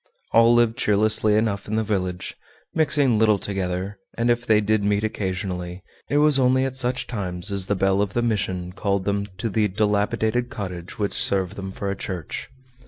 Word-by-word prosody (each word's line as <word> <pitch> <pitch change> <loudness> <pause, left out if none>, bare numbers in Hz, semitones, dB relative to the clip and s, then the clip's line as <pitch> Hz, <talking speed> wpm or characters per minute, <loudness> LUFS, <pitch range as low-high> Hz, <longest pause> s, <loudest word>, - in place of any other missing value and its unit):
All 115 +1 +5
lived 120 0 +3
cheerlessly 105 0 +3
enough 105 -2 0
in 110 - -2
the 110 - +1
village, 95 -4 -3 0.4
mixing 145 -7 +2
little 110 -2 +4
together, 95 0 -3 0.2
and 120 +1 +2
if 120 0 -1
they 110 -1 +5
did 105 0 +1
meet 105 +1 +1
occasionally, 95 -4 -4 0.3
it 145 - +1
was 150 -2 +5
only 130 +1 +3
at 130 -1 -4
such 130 0 0
times 95 -4 -1
as 100 -1 +1
the 100 - +1
bell 95 +1 +2
of 100 -1 -2
the 120 - 0
mission 95 -5 -2
called 100 0 -1
them 100 0 -1
to 105 - -2
the 110 0 +1
dilapidated 105 +4 0
cottage 90 -3 -7
which 100 -2 -1
served 95 -2 -1
them 95 -1 -6
for 100 +1 -4
a - - -3
church. 90 -4 -6
105 Hz, 185 wpm, -23 LUFS, 95-115 Hz, 0.4 s, All